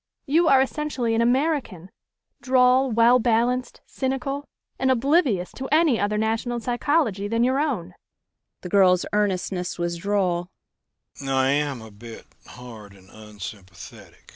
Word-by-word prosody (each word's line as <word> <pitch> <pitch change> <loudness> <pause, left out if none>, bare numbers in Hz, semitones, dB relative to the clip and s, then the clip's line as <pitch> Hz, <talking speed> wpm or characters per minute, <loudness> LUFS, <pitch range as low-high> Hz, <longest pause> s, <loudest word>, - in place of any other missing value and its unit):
You 320 +3 +2
are 270 -3 +5
essentially 265 -4 -2
an 225 - +1
American 245 - -1 0.5
droll, 255 +1 +3
well 235 +2 +4
balanced, 245 +2 0
cynical 275 +2 -4 0.3
and 265 - +1
oblivious 260 - +1
to 265 - -7
any 305 -6 +3
other 205 +1 0
national 225 +2 -1
psychology 240 - 0
than 230 +2 0
your 260 +2 +1
own." 230 - -2 0.7
The 180 - -7
girl's 185 -2 +4
earnestness 190 -3 -1
was 170 0 -2
droll. 180 -2 -1
240 Hz, 100 wpm, -23 LUFS, 200-270 Hz, 0.7 s, are